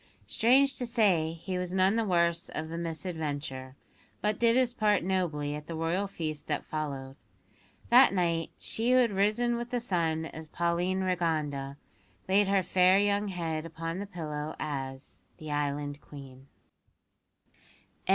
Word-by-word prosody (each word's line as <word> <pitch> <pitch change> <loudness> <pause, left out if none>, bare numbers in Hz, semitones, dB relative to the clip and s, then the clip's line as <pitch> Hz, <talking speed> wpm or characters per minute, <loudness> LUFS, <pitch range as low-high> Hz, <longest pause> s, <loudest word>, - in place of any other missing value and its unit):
Strange 265 +4 +3
to 245 - -1
say, 190 -9 +2
he 180 +2 -4
was 180 0 -3
none 190 +2 +4
the 230 - +2
worse 170 -3 +1
of 160 0 -3
the 165 - -5
misadventure, 150 -6 -4 0.4
but 210 0 0
did 235 0 +4
his 250 -2 +3
part 210 -5 +2
nobly 170 -6 -1
at 150 +1 -7
the 165 - -5
Royal 165 +5 0
feast 155 -6 -5
that 150 -2 -2
followed. 140 -4 -4 0.7
That 250 0 +8
night 170 -3 0
she 235 +3 0
who - - +6
had 245 -3 +4
risen 215 +5 +1
with 240 0 -5
the 245 - -1
sun 165 -8 0
as 160 0 -8
Pauline 175 +3 0
Rigonda, 155 -7 -1 0.5
laid 195 +1 +4
her 195 -1 +2
fair 185 +1 +4
young 205 +1 +2
head 165 -4 -3
upon 165 +2 -5
the 200 - -5
pillow 155 -5 -5
as 135 -3 -5 0.2
the 155 -1 -7
Island 145 0 -2
Queen. 135 -2 -12
170 Hz, 150 wpm, -29 LUFS, 155-200 Hz, 0.7 s, That